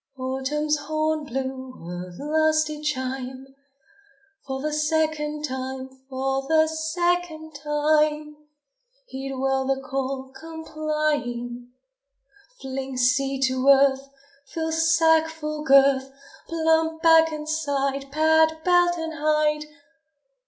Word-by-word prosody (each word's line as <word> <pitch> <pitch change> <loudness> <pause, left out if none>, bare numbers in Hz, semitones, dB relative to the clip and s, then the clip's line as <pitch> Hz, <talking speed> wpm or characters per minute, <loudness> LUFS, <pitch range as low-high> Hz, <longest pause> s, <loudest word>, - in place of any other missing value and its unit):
Autumn's 265 +4 -1
horn 310 +1 -1
blew 260 0 -5
a 180 +1 -6
lusty 310 0 +1
chime; 260 -2 -3 1.0
For 265 -1 -3
the 300 +2 -2
second 300 -1 0
time, 260 -1 -5 0.2
for 270 0 -2
the 315 +1 +4
second 320 0 -2
time! 300 +1 +1 0.7
Heed 270 - -6
well 265 0 0
the 270 0 +1
call, 265 0 -4
complying. 300 -6 -3 0.9
Fling 265 0 -5
seed 270 +2 +1
to 260 0 0
earth! 275 0 +4 0.4
Fill 320 +2 -3
sack's 320 0 +3
full 305 -1 -5
girth! 270 -1 +4 0.4
Plump 320 0 +1
back 325 -1 +6
and 305 0 -6
side! 275 -3 -1
Pad 315 +1 +3
belt 350 -1 +4
and 325 -1 -4
hide! 300 0 +1
300 Hz, 105 wpm, -24 LUFS, 265-315 Hz, 1.0 s, back